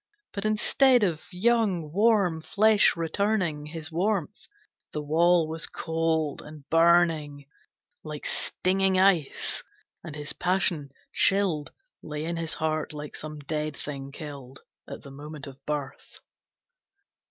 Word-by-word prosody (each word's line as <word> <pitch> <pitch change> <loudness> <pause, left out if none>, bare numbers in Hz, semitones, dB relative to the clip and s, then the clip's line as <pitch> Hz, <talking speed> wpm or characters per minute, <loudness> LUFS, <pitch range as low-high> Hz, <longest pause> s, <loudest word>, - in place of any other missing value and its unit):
But 200 0 -4
instead 245 +3 +4
of 175 -2 -2
young, 195 -5 +1
warm 200 -5 +3
flesh 210 +6 +4
returning 170 -3 0
His 160 +1 -7
warmth, 195 +2 -1 0.5
the 150 - -2
wall 165 +2 +3
was 160 +1 -3
cold 160 -2 -1
and 150 -2 -12
burning 165 -4 +3 0.6
Like 150 -1 -7
stinging 190 0 +1
ice, 185 -7 +2 0.4
and 155 -3 -8
his 150 -1 -5
passion, 180 -5 0 0.2
chilled, 190 -7 +2 0.3
Lay 150 0 -5
in 170 0 -3
his 165 -1 -2
heart 155 -1 -2
like 150 0 -7
some 155 0 -6
dead 150 0 -3
thing 140 -2 -5
killed 140 -3 -9 0.3
At - - -8
the 140 - -11
moment 145 +1 -8
of 135 -1 -12
birth. 145 -2 -5
160 Hz, 125 wpm, -27 LUFS, 150-185 Hz, 0.6 s, instead